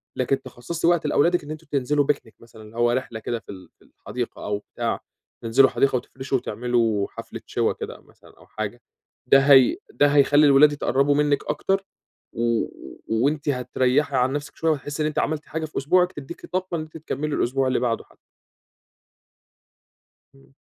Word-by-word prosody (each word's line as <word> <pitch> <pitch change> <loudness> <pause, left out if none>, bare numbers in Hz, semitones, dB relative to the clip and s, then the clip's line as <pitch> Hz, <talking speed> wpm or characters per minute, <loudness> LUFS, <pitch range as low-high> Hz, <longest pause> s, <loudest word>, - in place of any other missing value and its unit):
لكن 135 +1 0
تِخصَّصي 130 +7 -4
وقت 175 -3 +2
لأولادِك 170 +4 +2
إن 145 - -8
أنتم 155 +1 -9
تنزلوا 145 +1 +1
picnic 125 -5 -18
مثلًا، 115 -1 -14
اللي 110 +2 -13
هو 120 0 +3
رحلة 120 -2 -3
كده 115 +1 -3
في 105 - -25
ال 95 -2 -12
في - - -23
الحديقة - - -6
أو 105 0 -1 0.2
بتاع، - - -1 0.4
تنزلوا 125 +4 +5
حديقة 140 -1 +1
وتفرشوا 130 +2 -3
وتعملوا 115 -3 0
حفلة - - -9
شوى - - 0
كده - - -8
مثلًا - - -21
أو - - -19
حاجة، 110 +3 -5 0.5
ده 135 - +7
هي 135 -2 +6
ده 145 - +3
هيخلّي 145 +1 +5
الولاد 145 +1 +7
يتقرّبوا 140 0 +1
منِك 145 -1 +1
أكتر، 195 +6 0 0.5
و 115 -1 0 0.4
وأنتِ 145 +7 0
هتريَّحي 130 +2 +1
عن 125 +1 +2
نفْسِك 145 0 -5
شوية 165 0 +1
وهتحسّي 145 +1 -3
إن - - +1
أنتِ 155 - -2
عملتِ 155 -1 -1
حاجة 160 +1 -4
في 155 - -9
أسبوعِك 180 +6 +3
تديكِ 145 +3 -9
طاقة 185 -1 -3
إن - - -3
أنتِ 155 +1 -9
تكمّلي 150 -1 -3
الأسبوع 130 +2 +1
اللي 130 - +1
بعده 120 -2 -1
حتّى. - - -25 2.2
إمم. 135 0 -22
135 Hz, 175 wpm, -23 LUFS, 120-150 Hz, 2.2 s, ده